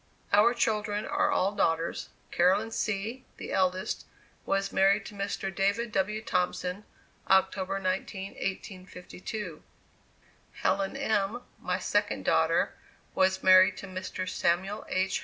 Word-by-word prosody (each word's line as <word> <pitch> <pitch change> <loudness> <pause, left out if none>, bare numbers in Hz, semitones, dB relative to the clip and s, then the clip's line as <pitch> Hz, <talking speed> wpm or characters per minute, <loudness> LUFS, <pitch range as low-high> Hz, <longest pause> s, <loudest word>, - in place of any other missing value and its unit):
Our 230 +4 +6
children 210 -2 0
are 295 - +1
all 200 -9 +2
daughters: 165 -4 0 0.2
Caroline 195 +6 +3
C., 220 +4 -2
the - - -7
eldest, 185 +2 0 0.4
was 195 0 0
married 200 +2 +4
to - - -8
Mr. 195 -1 -3
David 200 +4 0
W. 210 +3 -1
Thompson, 180 -2 -1 0.4
October 190 0 +2
19, 190 +1 -3
1852; 185 -1 -6 0.9
Helen 195 +6 0
M., 220 -3 0 0.2
my - - -1
second - - 0
daughter, - - +2 0.4
was 190 0 +2
married 185 0 +7
to - - -7
Mr. 185 0 -5
Samuel 190 +5 0
H. 190 0 0
195 Hz, 120 wpm, -29 LUFS, 185-210 Hz, 0.9 s, married